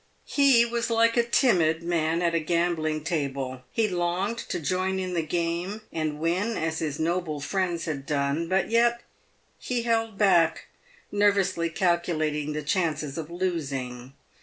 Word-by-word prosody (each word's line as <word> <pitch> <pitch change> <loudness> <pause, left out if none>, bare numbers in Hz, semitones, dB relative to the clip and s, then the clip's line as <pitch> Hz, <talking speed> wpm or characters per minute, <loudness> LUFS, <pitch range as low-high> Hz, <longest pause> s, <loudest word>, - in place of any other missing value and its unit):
He 275 -5 +5
was 235 0 -2
like 230 0 +3
a 240 - +5
timid 170 - +2
man 170 0 0
at 170 -1 +2
a 165 - +2
gambling 160 -2 0
table. 140 -5 -3
He 225 -1 +1
longed 180 +4 -1
to - - -4
join 185 +4 -1
in 185 -1 -3
the 170 - +1
game, 170 +5 -2
and 155 -2 -2
win 185 +8 0
as 160 0 -1
his 150 -3 -2
noble 165 -2 -1
friends 175 +2 -1
had 140 -4 -4
done, 145 +2 0
but 190 +3 +1
yet 235 +1 +3 0.6
he 245 -2 -2
held 225 -3 0
back, 175 -6 +3 0.5
nervously 195 -4 +2
calculating 155 -4 0
the 150 0 -3
chances 150 -3 -1
of 160 -1 -5
losing. 135 -8 -3
170 Hz, 150 wpm, -26 LUFS, 155-195 Hz, 0.6 s, He